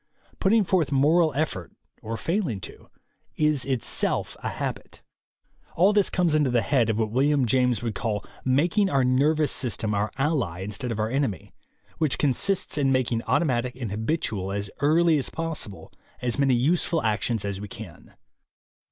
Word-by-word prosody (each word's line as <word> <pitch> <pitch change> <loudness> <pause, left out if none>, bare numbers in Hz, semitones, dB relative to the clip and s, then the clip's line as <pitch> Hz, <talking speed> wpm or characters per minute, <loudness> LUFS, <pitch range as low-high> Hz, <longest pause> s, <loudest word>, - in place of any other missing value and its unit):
Put 190 - +2
ting 220 +1 +4
forth 175 -6 +1
moral 155 +4 +4
effort, 95 - -2 0.3
or 115 +1 -4
failing 165 - -1
to, - - -11 0.5
is 150 -4 +1
itself 130 -4 -1
a - - -2
habit. - - -6 0.7
All 190 +5 +4
this 205 -2 +3
comes 175 -4 +1
under 150 -3 +3
the 120 -2 +2
head 125 -6 +2
of 110 - 0
what 110 -1 0
William 140 +2 +2
James 125 -1 +1
would 115 -2 -2
call 105 -1 -3 0.2
making 170 +10 +2
our 135 -4 +2
nervous 145 +4 +2
system 110 -4 -2
our 105 +1 0
ally 135 - 0
instead 110 +6 -4
of 110 - -3
our 110 +1 -1
enemy, 135 -7 -2 0.5
which 155 -4 +1
consists 150 +4 0
in 135 -2 +2
making 125 -3 +1
automatic 125 -6 +1
and 120 -5 -5
habitual, 110 - -2
as 100 0 -4
early 160 +2 +4
as 135 - -2
possible, 165 -11 -5 0.3
as 125 +2 -2
many 135 -2 +4
useful 160 +5 +1
actions 110 0 0
as 100 -1 -4
we 105 - -6
can. 100 -4 -11
130 Hz, 165 wpm, -25 LUFS, 110-155 Hz, 0.7 s, ting